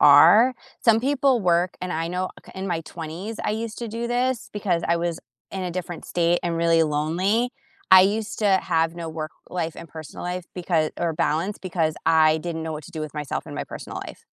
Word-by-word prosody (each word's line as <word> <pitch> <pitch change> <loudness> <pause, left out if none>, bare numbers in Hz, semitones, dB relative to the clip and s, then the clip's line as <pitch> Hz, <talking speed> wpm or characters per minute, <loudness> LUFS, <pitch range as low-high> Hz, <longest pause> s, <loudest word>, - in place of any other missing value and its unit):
are?" 170 - +8 0.3
Some 225 -1 +5
people 270 -1 +2
work, 175 -1 +2
and 180 0 -3
I 165 +1 -1
know 180 +1 -2 0.2
k - - -14
in 190 +1 -4
my 170 -3 -1
20s, 170 +8 -6
I - - 0
used 220 0 -4
to 235 -2 -4
do 230 +2 -3
this 245 0 0
because 185 -5 0
I 170 - +3
was 170 -1 -2 0.3
in 190 - -4
a 180 - -2
different 175 -1 -5
state 175 0 +1
and 170 -1 -1
really 165 -1 +4
lonely. 170 +10 +1 0.4
I 185 0 +11
used 205 +1 0
to 210 - +2 0.2
have 165 -2 +1
no 170 -1 -5
work 155 -1 -5 0.2
life 165 -2 -3
and 165 - -9
personal 155 +1 -9
life 180 0 -3
becau 170 -3 +1
or 170 -1 0
balance 165 +6 0
because 170 -4 -1
I 160 -1 +5
didn't 165 0 -4
know 160 - -4
what 150 -2 -6
to 175 - -13
do 160 - -5
with 155 -2 -5
myself 150 -3 -3
in - - -7
my - - -3
personal - - -7
life. - - -11
175 Hz, 215 wpm, -24 LUFS, 160-200 Hz, 0.4 s, I